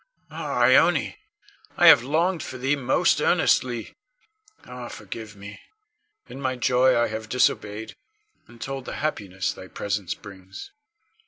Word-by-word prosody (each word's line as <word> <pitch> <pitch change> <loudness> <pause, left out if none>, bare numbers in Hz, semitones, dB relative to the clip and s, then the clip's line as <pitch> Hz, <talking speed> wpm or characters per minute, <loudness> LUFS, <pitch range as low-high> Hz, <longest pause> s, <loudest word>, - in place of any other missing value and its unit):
Ah, - - -2
Ione, - - +4 0.6
I 175 - +4
have 160 -7 +9
longed 165 +6 0
for 130 - -7
thee 135 +3 0
most 130 -2 +1
earnestly. 120 -3 +1 0.7
Ah, 125 -1 -8
forgive 105 0 -9
me! 100 +1 -11 0.7
In 135 - -10
my 130 -1 -1
joy 125 +1 +3
I 120 - +2
have 110 0 -6
disobeyed, 110 -3 0 0.5
and 120 - -17
told 135 0 -5
the - - -6
happiness 95 -11 -3
thy 95 - -11
presence 100 -2 -3
brings. 95 - -12
120 Hz, 135 wpm, -24 LUFS, 105-130 Hz, 0.7 s, have